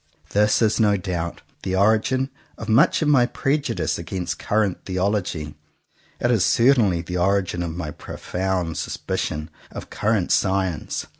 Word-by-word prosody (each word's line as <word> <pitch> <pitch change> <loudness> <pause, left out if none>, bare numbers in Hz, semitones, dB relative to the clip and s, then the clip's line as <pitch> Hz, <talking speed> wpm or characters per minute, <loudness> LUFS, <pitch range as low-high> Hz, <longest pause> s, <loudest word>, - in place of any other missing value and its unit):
This 105 +3 +3
is 110 +1 +2
no 105 -2 +4
doubt 90 -3 -4 0.2
the 95 - -2
origin 110 +7 +2 0.3
of 110 - -7
much 135 +9 +4
of - - 0
my 130 -5 +5
prejudice 140 +4 -1
against 90 -2 -4
current 105 -3 0
theology. 90 -5 -2 0.7
It 120 - +1
is 110 -7 +3
certainly 115 -9 +4
the 90 +1 -4
origin 95 -1 +1
of 85 -1 -4
my 75 -4 -4
profound 90 +1 -3
sus - - -4
picion 75 +2 -3 0.2
of - - -9
current 105 -4 0
science. 95 -4 0
95 Hz, 145 wpm, -23 LUFS, 90-110 Hz, 0.7 s, my